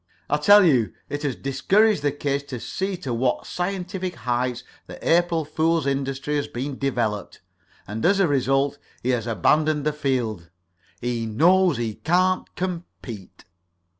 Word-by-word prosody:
I 150 - +4
tell 205 +6 +7
you 125 -9 +3 0.2
it 145 - -3
has 140 -5 -1
discouraged 190 +9 +2
the 145 0 +1
kid 140 0 -2
to 130 -3 -5
see 190 - -3
to 130 -7 -4
what 125 +1 0
scientific 180 0 -3
heights 125 0 -2 0.2
the - - -9
April 170 -1 +3
fool 160 +1 +1
industry 135 +1 -1
has 145 - -2
been 130 +2 -5
developed, 120 -7 -2 0.5
and 110 +2 -5
as 195 +2 +4
a 195 - +4
result 135 0 +1 0.2
he 125 - -1
has 120 -2 0
abandoned 150 - +2
the 150 - +1
field. 120 - -2 0.5
He 120 -2 -2
knows 170 - +4
he 115 -2 -2
can't 185 - 0
compete." 165 - -6
140 Hz, 150 wpm, -24 LUFS, 125-170 Hz, 0.5 s, tell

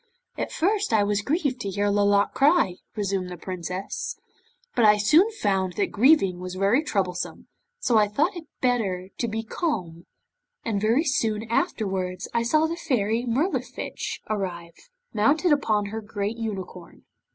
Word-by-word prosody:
'At - - -3
first 410 +4 0
I 215 -2 +4
was 205 0 0
grieved 280 - -1
to 200 - -3
see 195 - -6
Lolotte 205 0 +3
cry,' 270 - +3 0.2
resumed 195 -3 -1
the 180 - -7
Princess, 185 - -5 0.6
'but 235 - +2
I 210 -1 +7
soon 305 - +5
found 195 - -1
that 200 - -1
grieving 210 - +4
was 180 0 -6
very 200 +8 +3
troublesome, 185 - -2 0.3
so 235 - +3
I 210 - +4
thought 305 - 0
it 340 -2 -7 0.2
better 195 -8 0
to 235 - 0
be 225 0 -3
calm, 180 - -3 0.6
and 210 -3 -1
very 230 +8 +3
soon 225 -7 0
afterwards 190 - -1
I 235 - +2
saw 305 +7 +3
the 330 +1 -3
Fairy 235 -5 0
Mirlifiche 260 +2 -2
arrive, 185 - -5 0.2
mounted 295 - +3
upon 215 -8 +2
her 220 0 -4
great 210 0 -3
unicorn. 190 -6 -6
215 Hz, 150 wpm, -25 LUFS, 195-270 Hz, 0.6 s, I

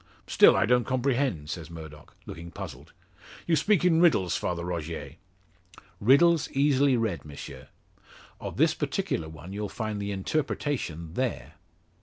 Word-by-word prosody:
"Still - - +6
I - - +3
don't 125 +1 +3
comprehend," 125 - -1
says 80 -2 -6
Murdock, 80 -3 -11
looking 85 +1 -8
puzzled. - - -9 0.5
"You 170 - +3
speak 180 +3 +2
in 165 -2 +4
riddles, 100 - +3
Father 85 -1 -2
Rogier." 80 -3 -5 0.8
"Riddles 145 +8 +4
easily 140 -1 +3
read, 110 -7 -2
M'sieu. 75 -2 -9 0.7
Of - - -6
this - - +4
particular 80 - -2
one 80 +4 -10
you'll 105 0 -4
find 110 -1 -4
the 100 0 -3
interpretation 95 - -2
there." 130 +5 -3
105 Hz, 135 wpm, -27 LUFS, 85-140 Hz, 0.8 s, Still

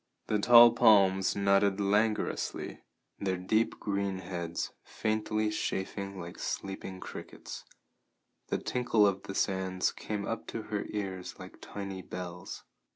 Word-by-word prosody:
The 105 - +1
tall 120 +2 +9
palms 95 -5 +5
nodded 100 0 +3
languorously, 105 +2 0 0.4
their 95 -2 -1
deep 110 +5 +1
green 100 -1 -1
heads 85 -2 -4
faintly 110 0 -1
chafing 100 -1 -3
like 85 0 -8
sleeping 95 -1 -4
crickets; - - -8 0.8
the - - 0
tinkle 120 -4 +2
of 100 -1 +1
the 95 - -7
sands 95 -1 0
came 105 -2 -4
up 115 - -4
to 115 - -5
her 105 -1 -3
ears 95 -3 -4
like - - -11
tiny 100 -2 -6
bells. 90 0 -7
100 Hz, 125 wpm, -31 LUFS, 95-105 Hz, 0.8 s, tall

